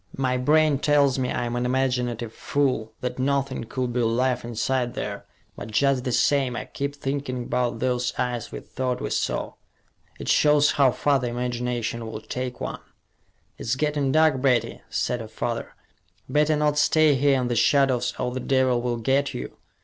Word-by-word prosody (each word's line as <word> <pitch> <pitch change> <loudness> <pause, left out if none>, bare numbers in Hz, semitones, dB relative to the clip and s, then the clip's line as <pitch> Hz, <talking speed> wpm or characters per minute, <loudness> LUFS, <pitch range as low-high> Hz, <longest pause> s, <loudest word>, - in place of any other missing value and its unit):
My 130 -1 +1
brain 150 +2 +3
tells 140 -3 +3
me 125 -1 -1
I'm 120 0 -2
an 120 - -1
imaginative 125 -3 -1
fool, 130 -6 -1
that 125 0 -4
nothing 135 -2 0
could 125 +1 -3
be 125 - 0
alive 125 +2 +1
inside 120 +1 -1
there, - - -5 0.3
but 105 - -8
just 135 +3 +1
the 125 - -1
same, 135 0 +2
I - - -4
keep 140 +1 -4
thinking 135 -3 -3
about 125 0 -1
those 125 -1 0
eyes 120 -2 -2
we - - -6
thought 125 -1 -3
we - - -4
saw. - - -1 0.6
It - - -8
shows 150 -1 +4
how 140 -2 +4
far 140 +2 +1
the 125 - -2
imagination 120 -1 -3
will 110 -1 -6
take 125 +2 -5
one." - - -5 0.8
"It's 115 - -1
getting 145 -1 0
dark, 155 -3 +3
Betty," 130 -3 +1
said 120 -1 -1
her 110 - -7
father. 115 +1 -4 0.5
"Better 150 +3 +2
not 150 0 +1
stay 155 0 +4
here 135 0 +3
in 125 - -1
the 120 - -1
shadows 130 +1 +2
or 125 -1 -2
the 130 - -3
devil 130 -1 +2
will 120 -1 -1
get 135 +5 0
you. 60 - -6
130 Hz, 175 wpm, -24 LUFS, 120-140 Hz, 0.8 s, shows